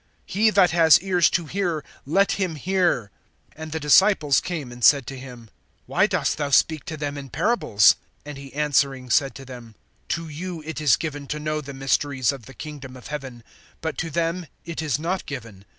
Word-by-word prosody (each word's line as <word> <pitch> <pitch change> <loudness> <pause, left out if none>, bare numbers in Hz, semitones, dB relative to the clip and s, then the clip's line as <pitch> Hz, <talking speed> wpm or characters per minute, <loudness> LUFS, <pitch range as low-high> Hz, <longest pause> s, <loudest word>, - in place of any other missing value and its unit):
(9)He 215 +2 +3
that 185 -3 +5
has 160 -3 +6
ears 180 -3 +3
to 175 - -1
hear, 175 -3 -2 0.2
let 195 +7 +3
him 185 -5 -1
hear[13:9]. 175 - 0 0.5
(10)And 155 0 -8
the 160 - -2
disciples 150 -1 +4
came 155 -8 -5
and 120 0 -10
said 140 0 +6
to 135 - -7
him: 125 -4 -11 0.3
Why - - +2
dost - - -1
thou 145 -1 -1
speak 155 +2 +3
to 155 - -6
them 145 -1 -4
in 135 -1 -9
parables? 110 - +3 0.3
(11)And 145 -1 -8
he 135 -2 -11
answering 140 -4 +1
said 140 -3 +2
to 135 - -10
them: 120 -4 -11 0.3
To 165 0 -2
you 165 +2 -6
it 160 0 -5
is 150 -3 +4
given[13:11] 145 -3 -5
to 150 - -4
know 155 0 -2
the 140 -1 -9
mysteries 135 -1 +1
of 135 -5 -10
the 135 - -13
kingdom 140 -4 -9
of 125 - -12
heaven; 135 -5 -7 0.4
but 160 -1 -3
to 165 - -2
them 170 +2 -2 0.2
it 170 -1 -5
is 150 -4 0
not 175 +5 -3
given. 115 -8 -8
150 Hz, 200 wpm, -23 LUFS, 135-165 Hz, 0.5 s, has